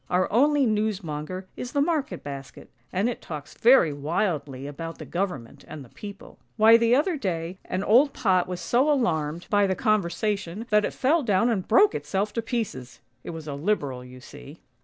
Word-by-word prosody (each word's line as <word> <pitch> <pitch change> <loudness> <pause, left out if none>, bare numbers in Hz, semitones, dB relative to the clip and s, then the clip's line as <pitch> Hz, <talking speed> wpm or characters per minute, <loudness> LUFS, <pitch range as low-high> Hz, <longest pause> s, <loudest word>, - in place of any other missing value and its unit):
Our 180 +1 +2
only 285 +3 +4
newsmonger 185 -6 -2
is 245 - -6
the 285 - +1
market 285 - -1
basket, 135 -2 -9 0.2
and 195 +5 0
it 245 - -4
talks 150 -3 -8
very 230 - +5
wildly 145 -3 -2
about 165 +3 -7
the - - -8
Government 175 -11 -4
and 150 -3 -9
the - - -18
People. 200 -1 -10 0.2
Why 220 +1 +7
the 230 +1 +4
other 310 +4 +1
day 180 - -3
an 185 +2 -3
old 260 +8 +5
pot 185 -8 +1
was 180 -1 -5
so 260 +5 +2
alarmed 165 - 0
by 205 -1 +4
the 190 - 0
conversa 215 +1 +2
THE 170 - -5
FLYING 205 +4 -1
TRUNK - - -7
29 170 +1 -9
tion, 225 +3 -7
that 210 0 +4
it - - -5
fell 310 +6 +3
down 220 -2 +2
and 195 -5 -2
broke 215 -2 +5
itself 190 +8 -2
to 230 - -1
pieces! 215 - -4 0.2
It - - -8
was 160 -2 -7
a 145 - -4
Liberal 140 -5 -2
you 125 0 -12
see! 145 +4 -13
190 Hz, 205 wpm, -25 LUFS, 155-230 Hz, 0.2 s, Why